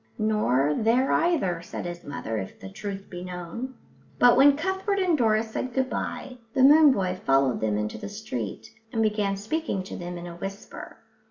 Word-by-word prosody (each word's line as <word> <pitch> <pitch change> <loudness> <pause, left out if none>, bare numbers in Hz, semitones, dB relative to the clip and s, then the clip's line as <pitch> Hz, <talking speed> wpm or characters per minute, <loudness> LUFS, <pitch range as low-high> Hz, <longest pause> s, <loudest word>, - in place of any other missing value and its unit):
"Nor 150 - +2
there 240 +4 +3
either," 275 - +1
said 170 - -7
his 175 0 -6
mother, 115 -5 -4
"if 95 - -8
the 95 - -8
truth 195 - -6
was 175 0 -6
known." 180 +8 -6 0.4
But 245 -1 +6
when 280 +2 +6
Cuthbert 380 +4 -1
and 370 -4 +2
Doris 220 -4 +1
said 255 +2 -4
good 260 -1 0
bye 255 -1 -4 0.2
the 265 - +4
moon 295 +2 +8
boy 185 -6 -1
followed 135 -2 +2
them 105 -1 +1
into 105 0 -3
the 205 - -6
street 220 +5 -6 0.2
and 225 -1 +1
began 210 -2 0
speaking 215 -1 -2
to 190 - -8
them 175 0 -6
in 175 - -7
a 170 -1 -8
whisper. 195 +3 -8
210 Hz, 185 wpm, -26 LUFS, 175-260 Hz, 0.4 s, moon